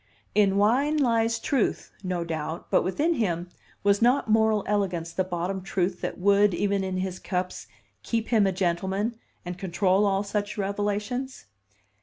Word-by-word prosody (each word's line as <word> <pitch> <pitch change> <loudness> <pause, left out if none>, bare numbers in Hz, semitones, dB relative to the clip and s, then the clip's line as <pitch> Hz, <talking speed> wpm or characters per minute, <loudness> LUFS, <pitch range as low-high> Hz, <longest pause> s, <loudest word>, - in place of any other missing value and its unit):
In 200 -2 +3
wine 260 +9 +3
lies 230 -4 +2
truth, 265 -6 -1
no 180 -2 -2
doubt; 160 0 -5
but - - +4
within 295 - +1
him, 175 - -1 0.3
was 200 +1 +3
not 250 +3 +3
moral 220 -1 +3
elegance 180 -5 -1
the 185 - +1
bottom 185 +1 -3
truth 185 -1 -1
that - - -3
would, 200 0 +4
even 200 0 0
in 190 -1 -2
his 185 0 -3
cups, 180 -1 -3 0.3
keep 225 - -2
him 215 -4 +4
a - - +2
gentleman, 190 +5 -1 0.3
and 180 +1 -6
control 190 +2 +2
all 195 0 +1
such 205 +1 -3
revelations? 205 +6 -2
200 Hz, 155 wpm, -26 LUFS, 185-220 Hz, 0.3 s, but